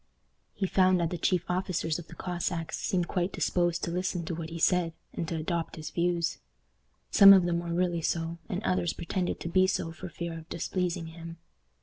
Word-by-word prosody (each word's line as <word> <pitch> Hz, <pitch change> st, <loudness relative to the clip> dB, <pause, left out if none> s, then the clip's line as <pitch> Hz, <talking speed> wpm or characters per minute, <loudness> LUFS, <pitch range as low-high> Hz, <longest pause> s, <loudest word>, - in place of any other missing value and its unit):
He 195 Hz, -, -1 dB
found 185 Hz, -1 st, +4 dB
that 170 Hz, -1 st, 0 dB
the 175 Hz, -, -2 dB
chief 180 Hz, +1 st, +2 dB
officers 180 Hz, -3 st, -1 dB
of 170 Hz, -, -10 dB
the -, -, -12 dB
Cossacks 175 Hz, -2 st, -3 dB
seemed 180 Hz, -2 st, 0 dB
quite 180 Hz, +2 st, -1 dB
disposed 175 Hz, -1 st, 0 dB
to 170 Hz, -, -1 dB
listen 180 Hz, -1 st, -2 dB
to 170 Hz, -, -3 dB
what 160 Hz, -1 st, -5 dB
he 165 Hz, -, -6 dB
said, 170 Hz, 0 st, +2 dB, 0.2 s
and 165 Hz, -, -3 dB
to 165 Hz, -, -3 dB
adopt 165 Hz, +1 st, -2 dB
his 155 Hz, -2 st, -7 dB
views. 170 Hz, -1 st, 0 dB, 0.7 s
Some 195 Hz, 0 st, +10 dB
of 190 Hz, -2 st, +6 dB
them 170 Hz, -1 st, +1 dB
were 170 Hz, 0 st, -4 dB
really 175 Hz, -1 st, 0 dB
so, 165 Hz, +1 st, -2 dB
and -, -, -3 dB
others 90 Hz, -2 st, +1 dB
pretended 180 Hz, +1 st, -2 dB
to -, -, -4 dB
be 185 Hz, +2 st, +4 dB
so 175 Hz, -3 st, -1 dB
for 180 Hz, +2 st, -8 dB
fear 170 Hz, 0 st, -5 dB
of 160 Hz, -, -15 dB
displeasing 175 Hz, 0 st, -2 dB
him. 165 Hz, 0 st, -9 dB
170 Hz, 205 wpm, -29 LUFS, 165-180 Hz, 0.7 s, Some